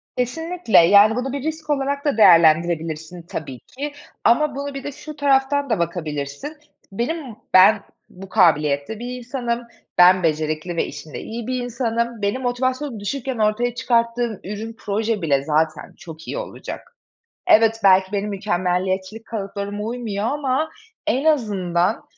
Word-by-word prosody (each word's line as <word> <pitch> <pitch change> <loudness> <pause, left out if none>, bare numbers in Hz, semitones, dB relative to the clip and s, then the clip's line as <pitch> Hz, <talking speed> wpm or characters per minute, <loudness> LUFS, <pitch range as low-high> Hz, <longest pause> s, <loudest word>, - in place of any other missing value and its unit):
Kesinlikle, 325 - 0
yani, 200 +5 +6
bunu 255 +2 -3
bir 280 -1 -4
risk 315 -1 -4
olarak 280 0 -1
da 285 - +1
değerlendirebilirsin 165 -2 +4
tabii 145 -7 -7
ki 285 +2 -7 0.3
ama 275 +4 +3
bunu 280 0 -4
bir 275 - -6
de 285 - -4
şu 305 +2 -10
taraftan 280 -1 +2
da 225 - +1
bakabilirsin: 155 - -4 0.3
"Benim 245 +3 -3 0.2
ben 200 +3 +7 0.3
bu 190 +1 -12
kabiliyette 155 0 +2
bir 245 +1 -5
insanım, 240 -1 -3 0.3
ben 180 0 +6
becerikli 155 +2 -1
ve - - +1
işinde 150 +1 -8
iyi 230 +1 -6
bir 255 -1 -2
insanım. 235 -2 -2
Benim 205 +6 -1
motivasyonum 255 0 -2
düşükken 255 +4 -3
ortaya 220 +3 +1
çıkarttığım 235 -2 0
ürün, 215 +3 -6
proje 215 0 -1
bile 140 -4 +1
zaten 155 0 -1
çok 165 -2 -11
iyi - - -4
olacak. - - -8 0.5
Evet, 225 0 +5
belki, 190 0 +5
benim 205 +1 -1
mükemmeliyetçilik 190 +1 -2
kalıplarıma 205 -1 -5
uymuyor 225 -3 -3
ama 285 +3 -1 0.4
en 275 -1 +1
azından, 200 - +1
220 Hz, 140 wpm, -21 LUFS, 180-255 Hz, 0.5 s, ben